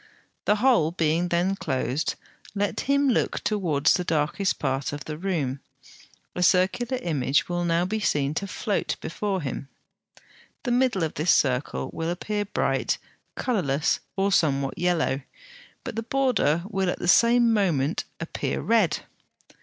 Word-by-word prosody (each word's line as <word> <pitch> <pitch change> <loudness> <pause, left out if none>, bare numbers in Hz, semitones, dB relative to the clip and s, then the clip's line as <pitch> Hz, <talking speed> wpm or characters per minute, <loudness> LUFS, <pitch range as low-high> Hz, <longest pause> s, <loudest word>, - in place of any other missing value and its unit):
The 210 - +4
hole 225 -8 +3
being 165 0 +1
then 175 +3 +1
closed, 130 -2 -1 0.4
let 205 0 -1
him 280 0 +3
look 250 - +1
towards 170 -10 +2
the 180 - 0
darkest 165 +4 0
part 135 -1 -1
of 145 -1 -6
the 155 - -5
room; 150 -7 -2 0.7
a 180 - -3
circular 190 +8 +2
image 145 -4 +1
will 175 0 -1
now 170 0 +1
be 215 +4 -2
seen 145 -8 0
to 200 +5 -3
float 200 +1 -2
before 190 0 -3
him. 135 0 -5 0.9
The 245 - -1
middle 245 -7 +2
of 160 - -2
this 155 +4 -1
circle 130 -2 +1
will 165 0 -3
appear 205 +4 -2
bright, 200 - 0 0.4
colourless, 160 - 0 0.2
or 200 0 +1
somewhat 140 -6 +2
yellow, 165 -6 +1 0.6
but - - -6
the 225 - -1
border 230 - +1
will 195 -3 -1
at - - -2
the - - -4
same 235 +5 +5
moment 170 -8 +1
appear 165 - -3
red. 215 -8 +2
175 Hz, 145 wpm, -25 LUFS, 150-210 Hz, 0.9 s, same